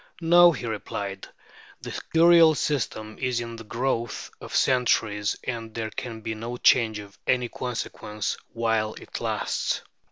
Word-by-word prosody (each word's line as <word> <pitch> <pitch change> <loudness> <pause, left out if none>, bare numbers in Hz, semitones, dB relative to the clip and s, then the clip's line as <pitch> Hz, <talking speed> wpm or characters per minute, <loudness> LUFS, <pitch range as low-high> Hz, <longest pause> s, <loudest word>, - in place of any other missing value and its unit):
"No," 175 +1 +7
he 130 -6 -5
replied, 100 -3 -4 0.5
"the - - -6 0.2
Curial 165 -1 +7
system 110 -7 -2
is 125 -2 0
the 115 -1 -5
growth 120 0 -2
of - - -7
centuries, 110 -5 +2
and 115 -3 -5
there 110 -1 -3
can 115 -2 -6
be 110 0 -3
no 115 +3 -5
change 115 -3 +4
of 100 -1 -11
any 125 -2 +2
consequence 110 -4 -4 0.2
while 115 -2 0
it - - -8
lasts. - - -1
115 Hz, 135 wpm, -26 LUFS, 110-125 Hz, 0.5 s, No